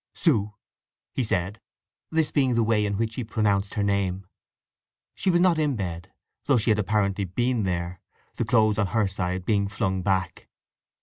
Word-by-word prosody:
"Soo!" 105 - +1 0.6
he 130 - 0
said 100 -2 -1 0.5
(this 160 -1 +1
being 130 -4 +2
the 115 - +3
way 105 -2 +2
in 100 -1 -2
which 115 +1 -1
he 125 - -3
pronounced 105 -3 0
her 105 - 0
name). 100 -1 0 0.9
She - - -1
was 175 -1 +4
not 175 -2 +3
in 150 -2 +1
the - - -4
bed, 85 -4 -5 0.3
though 140 - +4
she 110 0 +2
had 105 - +2
apparently 100 -1 0
been 120 +4 0
there—the 90 -1 -5
clothes 110 -2 +3
on 100 - +2
her 110 +2 +1
side 90 -1 -2
being 100 -2 +1
flung 95 -2 -1
back. 95 -1 -1
105 Hz, 175 wpm, -25 LUFS, 95-115 Hz, 0.9 s, was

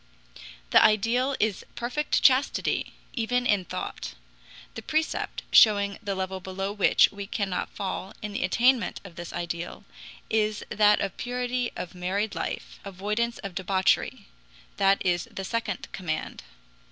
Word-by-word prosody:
The - - +7
ideal 235 +6 +3
is 210 -2 0
perfect 250 +6 -1
chastity, 265 +2 +3 0.2
even 245 +1 0
in 205 -5 +2
thought. - - -5 0.6
The 225 - -6
precept, 315 +6 -1
showing 200 -2 +6
the 200 -3 -2
level 190 0 -3
below 190 +1 -4
which 205 -2 +5
we 200 -1 -7
cannot 195 -4 -2
fall 190 0 -4
in 210 -1 -6
the - - -1
attainment 240 +7 +2
of 185 -4 -12
this 175 0 -7
ideal, 170 0 -5 0.4
is 215 -1 0
that 210 0 +4
of 195 -1 -3
purity 245 0 -2
of 175 - -6
married 190 +4 -2
life, - - -5
avoidance 210 +5 -2
of 195 -2 -5
debauchery. 190 +1 +1 0.5
That 195 0 +3
is 175 -1 +1
the 195 - -5
second 230 +3 -3
command. 160 -4 -4
205 Hz, 140 wpm, -27 LUFS, 190-230 Hz, 0.6 s, The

